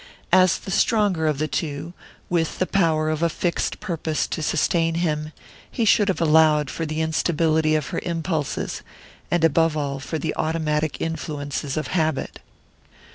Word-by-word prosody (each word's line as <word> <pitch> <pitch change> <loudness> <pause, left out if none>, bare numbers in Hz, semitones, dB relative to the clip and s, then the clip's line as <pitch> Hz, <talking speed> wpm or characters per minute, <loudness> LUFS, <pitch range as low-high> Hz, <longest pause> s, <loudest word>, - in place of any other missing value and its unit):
As 185 -1 +5
the 195 - -8
stronger 195 -7 +2
of 150 -2 +1
the 155 +2 -1
two, 155 +1 -4 0.3
with 165 -2 0
the 185 - +1
power 160 -5 +1
of 155 0 -2
a 170 - +3
fixed 170 +2 -2
purpose 165 -6 -2
to - - -3
sustain 165 +1 +1
him, 155 -3 -1 0.4
he 230 - -1
should 210 -1 +4
have 190 - 0
allowed 155 -3 +4
for 165 - -3
the 155 +1 -2
instability 160 -1 +1
of 155 -2 -1
her - - -2
impulses, 165 -3 -2 0.5
and 175 -1 +1
above 165 0 +3
all 140 -2 -2
for 160 +4 -4
the 150 - -3
automatic 155 -1 -1
influences 145 -3 -3
of 155 - -2
habit. 160 -6 -1
160 Hz, 160 wpm, -23 LUFS, 155-170 Hz, 0.5 s, As